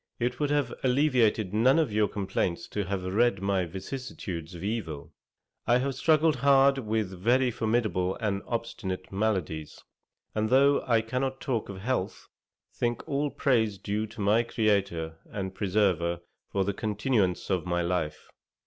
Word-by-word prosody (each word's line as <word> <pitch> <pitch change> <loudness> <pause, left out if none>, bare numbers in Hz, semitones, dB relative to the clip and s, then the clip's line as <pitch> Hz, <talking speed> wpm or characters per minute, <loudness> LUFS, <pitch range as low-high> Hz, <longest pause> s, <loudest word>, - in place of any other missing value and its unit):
It 120 +1 -1
would 145 -1 +1
have 145 -4 +1
alleviated 125 -7 +2
none 125 +7 +4
of 155 -10 +1
your 105 0 +3
complaints 95 -1 -2
to 105 -2 -2
have 95 0 -3
read 100 +3 +2
my 95 -1 0
vicissitudes 95 -3 -6
of 85 - -8
evil. 90 -10 -4 0.5
I 120 +1 +5
have 135 +2 -1
struggled 155 +2 +3
hard 135 +1 +5
with 110 -4 -1
very 120 +7 +2
formidable 110 -5 0
and 100 -4 -2
obstinate 100 -6 -4
maladies; 95 -7 -2 0.5
and 110 0 0
though 140 +2 +5
I 115 -3 +4
cannot 130 +4 -2
talk 120 -6 -2
of 95 -1 -7
health, 120 -4 -2 0.4
think 120 -1 -2
all 145 +1 0
praise 110 -8 +1
due 105 +3 -2
to 110 0 -9
my 105 +3 +4
Creator 100 -8 0
and 95 -3 -4
Preserver 90 -4 +1 0.3
for 100 - +1
the 100 - -1
continuance 105 -3 0
of 90 -1 0
my 85 0 0
life. 85 -3 -2
110 Hz, 150 wpm, -28 LUFS, 95-125 Hz, 0.5 s, I